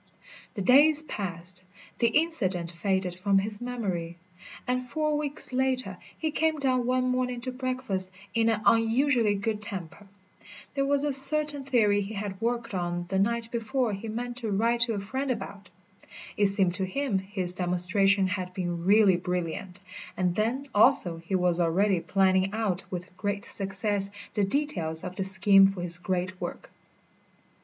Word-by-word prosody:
The 200 - -3
days 290 +7 +6
passed, 185 - -6 0.4
the 235 - +4
incident 225 - 0
faded 190 0 -1
from 195 +2 +1
his 205 +2 -1
memory, 190 -9 -4 0.5
and 250 0 -2
four 305 +3 0
weeks 290 -3 -3
later 255 -7 0 0.2
he 315 -1 -2
came 315 0 0
down 255 -3 0
one 255 0 +1
morning 250 -1 -1
to 255 +1 -4
breakfast 255 -7 -2 0.2
in 230 0 +2
an 215 -2 -1
unusually 230 -1 +3
good 210 +1 -2
temper. 195 -1 -7 0.7
There 275 -1 0
was 285 0 +1
a 295 - 0
certain 295 +1 +1
theory 215 -6 +2
he 205 +2 -6
had 200 -1 -5
worked 235 -1 -2
on 175 -1 -2
the 190 0 0
night 230 +3 0
before 235 0 -1
he 200 +3 -6
meant 240 +2 -5
to 230 -3 -3
write 230 +4 +1
to 230 -1 +3
a - - -2
friend 260 +8 -4
about. 200 -4 -5 0.7
It 205 - +3
seemed 195 -3 +2
to 190 - -2
him 225 0 -1
his 190 -2 -1
demonstration 185 +2 +1
had 185 -1 -4
been 175 -2 -3
really 200 -2 +5
brilliant, 180 +1 -4 0.4
and 180 -2 +1
then, 230 +8 -1
also, 205 -6 +3
he 170 +4 -4
was 180 -1 +1
already 180 +3 +2
planning 190 +2 +1
out 195 -4 -1
with 180 0 -7
great 205 0 -3
success 195 0 -1 0.2
the 205 - 0
details 190 - +2
of 180 0 -6
the 195 - -2
scheme 195 +1 +6
for 195 -2 -4
his 170 0 +2
great 185 0 -3
work. - - -6
205 Hz, 165 wpm, -27 LUFS, 185-250 Hz, 0.7 s, days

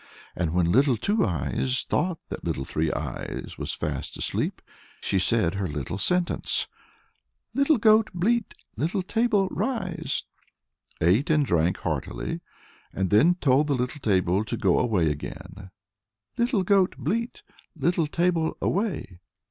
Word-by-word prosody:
And 85 -3 -1
when 85 -1 +2
Little 130 +2 +4
Two 205 - +1
Eyes 85 - 0
thought 175 +2 0
that - - -6
Little 70 - -2
Three 80 +2 -1
Eyes - - -5
was - - -2
fast - - -4
asleep, - - -2 0.4
she 95 - 0
said 100 -2 +3
her 100 -1 -2
little 75 +4 -4
sentence, 180 - +2 0.9
"Little 280 +2 +3
goat, 215 0 +5
bleat; 215 +5 0 0.2
little 180 +6 -1
table, 215 -1 +2
rise," 185 - -2 0.8
ate 95 - +3
and 150 -2 +3
drank 85 -3 +1
heartily, - - -3 0.5
and 95 -1 -2
then 150 +13 +5
told 145 -3 +3
the 145 - +1
little 125 +4 -3
table 95 -2 +2
to - - -4
go 95 -3 +3
away 95 -11 +2
again, 95 +6 -8 0.7
"Little 235 -4 +1
goat, 190 -1 +3
bleat; 215 - -2 0.3
little 165 +1 +1
table 170 0 0
away." 180 - -2
145 Hz, 135 wpm, -26 LUFS, -, 0.9 s, goat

